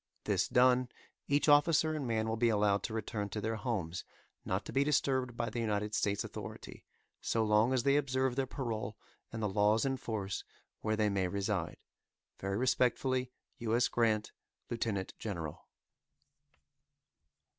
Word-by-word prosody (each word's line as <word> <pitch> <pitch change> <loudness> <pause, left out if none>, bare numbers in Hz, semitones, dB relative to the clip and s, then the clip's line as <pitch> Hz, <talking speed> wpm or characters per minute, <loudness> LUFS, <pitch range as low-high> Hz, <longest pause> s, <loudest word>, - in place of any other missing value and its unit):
This - - +1
done, 125 0 +4 0.4
each 145 +2 +2
officer 155 +2 +5
and 150 -4 -3
man 110 -1 0
will 110 - 0
be 115 +1 +3
allowed 105 -2 +2
to 110 - -4
return 105 -2 -3
to 105 - -4
their 110 +1 -2
homes, 100 -7 -3 0.4
not 95 +2 -2
to - - -7
be 135 - +3
disturbed 130 -4 +1
by 115 -1 -1
the 120 - -3
United 105 -2 -1
States 100 -1 +1
authority, - - -8 0.4
so 115 - +1
long 105 +3 +4
as 130 -2 +2
they 140 +1 +4
observe 130 -2 +1
their 135 0 0
parole 110 -6 -4 0.3
and 115 -1 -4
the - - +2
laws 105 +3 +3
in 135 -1 0
force 105 -6 -3 0.4
where 110 0 0
they 105 -1 +2
may 95 -2 +1
reside. 100 +2 -2 0.6
Very 100 +1 -2
respectfully, 130 +1 +1 0.3
U. 115 -1 0
S. 120 - +4
GRANT, 110 -3 +1 0.4
Lieutenant 110 -5 -2
General. 85 -8 -5
115 Hz, 155 wpm, -33 LUFS, 105-130 Hz, 0.6 s, officer